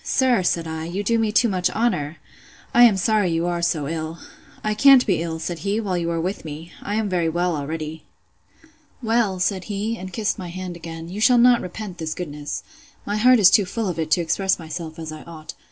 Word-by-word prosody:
Sir, 255 -6 +2
said 170 -2 0
I, 160 0 -4
you 185 +5 -3
do 230 +2 +1
me 220 -1 +1
too 235 +3 +4
much 185 -3 0
honour!—I 210 +3 -1
am 215 -5 +4
sorry 205 0 +2
you 165 0 0
are 175 -1 -1
so 160 -4 0
ill.—I 165 +6 -6
can't 265 +4 +6
be 185 -6 +1
ill, 165 -1 -3
said 165 +1 -5
he, 200 +2 -1
while 200 -5 -2
you 170 -1 -1
are 165 -1 -1
with 185 +4 -3
me. 160 +2 -8
I 205 - -3
am 220 -1 0
very 175 -4 0
well 175 +1 0
already. 155 +1 -5 1.0
Well, 225 -4 +1
said 185 0 0
he, 215 +2 -3
and 185 0 -7
kissed 210 0 -2
my 180 - -6
hand 180 0 -6
again, 165 -1 -8
you 195 +5 -6
shall 245 +2 +5
not 245 0 +5
repent 185 0 -7
this 160 -1 -3
goodness. 150 -4 -5 0.4
My 205 +1 -1
heart 250 +3 +6
is 200 -3 +7
too 205 - +5
full 215 +3 -3
of 175 -3 -3
it 160 -1 -2
to 165 +2 +3
express 190 +3 +1
myself 160 -1 -7
as 160 -1 -6
I 155 - -8
ought. 160 -2 -9
180 Hz, 220 wpm, -22 LUFS, 165-210 Hz, 1.0 s, is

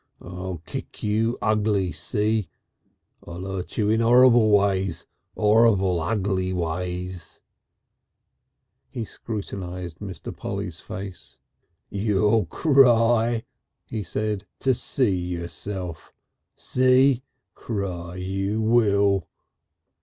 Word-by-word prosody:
I'll 90 -2 -7
kick - - -7
you 110 +3 +1
ugly, 105 -4 +1
see? 105 -3 -1 0.8
I'll 85 +2 -7
'urt 95 -2 -5
you 105 -3 +2
in 110 +1 +2
'orrible 120 -1 +6
ways 100 -3 +2 0.3
'orrible, 105 -5 +3
ugly 95 0 -1
ways...." 90 +1 -4 1.5
He 115 - -4
scrutinised 90 -6 -6
Mr. 95 -6 -7
Polly's 100 -4 -5
face. 100 -3 -8 0.5
"You'll 105 0 +2
cry," 120 - +4 0.4
he 110 - -4
said, 105 +2 -3 0.2
"to 130 - +3
see 120 -4 0
yourself. 90 0 -5 0.4
See? 130 0 +3 0.3
Cry 90 -5 -4
you 95 +3 -2
will." 100 -5 +3
100 Hz, 90 wpm, -24 LUFS, 90-110 Hz, 1.5 s, orrible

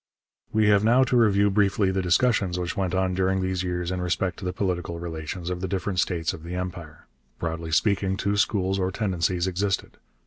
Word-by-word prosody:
We 110 0 +2
have 100 0 +4
now 120 +4 +5
to 130 - 0
review 100 -3 +4
briefly 100 -1 +2
the 95 0 0
discussions 95 0 +2
which 90 0 -3
went 95 -3 -1
on 95 0 +1
during 95 +1 +1
these 95 -1 -1
years 90 -1 -2
in 90 0 -2
respect 90 0 -1
to - - -7
the 90 - -1
political 90 -3 -2
relations 85 +1 -5
of 90 0 -4
the 95 - -2
different 95 -1 -2
states 85 -3 0
of 80 - -9
the 85 +2 -6
Empire. 90 -4 -6 0.3
Broadly 80 0 -4
speaking, 95 +2 +1
two 100 +1 0
schools 95 -2 +1
or 95 0 +1
tendencies 90 -3 0
existed. 95 +1 -2
95 Hz, 200 wpm, -25 LUFS, 90-100 Hz, 0.3 s, now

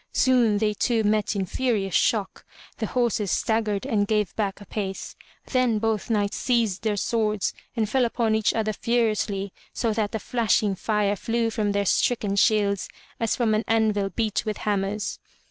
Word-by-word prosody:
Soon 245 -5 +3
they 210 0 +1
two 225 +1 +1
met 210 0 +1
in 195 -1 0
furious 210 -4 -1
shock; 210 -4 +1 0.4
the 220 - -1
horses 235 -5 0
staggered 215 -2 0
and 205 -2 +1
gave 210 -3 0
back 200 -3 -2
a 205 - -11
pace. 195 -1 -5 0.4
Then 255 -4 +2
both 220 0 -1
knights 205 -3 0
seized 230 -6 +1
their 215 -2 0
swords 215 -1 0 0.2
and 220 -3 +1
fell 260 +4 +2
upon 230 -1 +1
each 220 -1 +2
other 215 -1 -1
furiously 215 -4 0 0.2
so 230 -2 0
that 210 -1 -1
the 220 - -2
flashing 220 -2 +1
fire 205 +1 0
flew 230 +3 -1
from 215 -2 0
their 200 0 0
stricken 205 0 +1
shields 200 -1 +2 0.3
as 230 -2 +1
from 230 -3 +1
an 215 +1 +1
anvil 215 -3 +2
beat 220 0 -1
with 215 -1 -3
hammers. 205 +1 -1
215 Hz, 170 wpm, -25 LUFS, 205-225 Hz, 0.4 s, Soon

